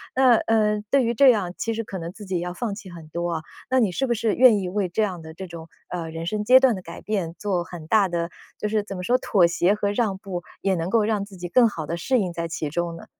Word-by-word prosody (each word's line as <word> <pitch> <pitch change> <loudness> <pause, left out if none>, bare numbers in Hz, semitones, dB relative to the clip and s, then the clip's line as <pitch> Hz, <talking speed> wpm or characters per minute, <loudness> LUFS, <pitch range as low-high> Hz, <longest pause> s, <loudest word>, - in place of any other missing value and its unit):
那， 255 -2 +6
呃， 215 -2 +2
对 275 -1 +4
于 235 - +1
这 270 +3 +6
样， 195 -6 -1
其 225 - -2
实 230 +1 -3
可 195 - -7
能 165 +1 -5
自 210 +2 -11
己 185 -2 -2
要 175 +1 -4
放 205 +3 -3
弃 200 -2 -10
很 170 -3 -11
多 170 +2 -3
啊， 160 - -2 0.3
那 260 0 +3
你 215 -6 +2
是 270 +9 -1
不 240 - +2
是 220 -2 0
愿 240 -5 +6
意 185 - -3
为 195 -1 -1
这 215 +5 0
样 185 -5 -3
的 160 0 -10
这 190 +2 -8
种， 165 -1 -9 0.2
呃， 170 -2 -4
人 165 +1 -6
生 210 +4 -2
阶 255 +4 +7
段 260 -4 +4
的 185 - -7
改 170 -1 -10
变 190 -6 -2
做 190 -4 -1
很 170 -2 -10
大 210 -1 +4
的 170 -1 -2 0.3
就 210 - -1
是 210 -1 0
怎 195 -2 -7
么 180 - -5
说 245 +7 +3
妥 185 -8 +3
协 175 +3 +2
和 205 -1 -1
让 205 -3 0
步？ 185 -3 -6 0.2
也 195 -1 +1
能 165 0 -2
够 225 +1 +3
让 210 -2 0
自 200 -2 -14
己 175 0 -5
更 245 +2 +5
好 165 -8 -5
地 170 +2 -3
适 255 +10 +1
应 185 -4 -1
在 170 0 -3
其 160 -2 -3
中 170 +2 -2
呢？ - - -11
195 Hz, 310 characters per minute, -24 LUFS, 170-220 Hz, 0.3 s, 阶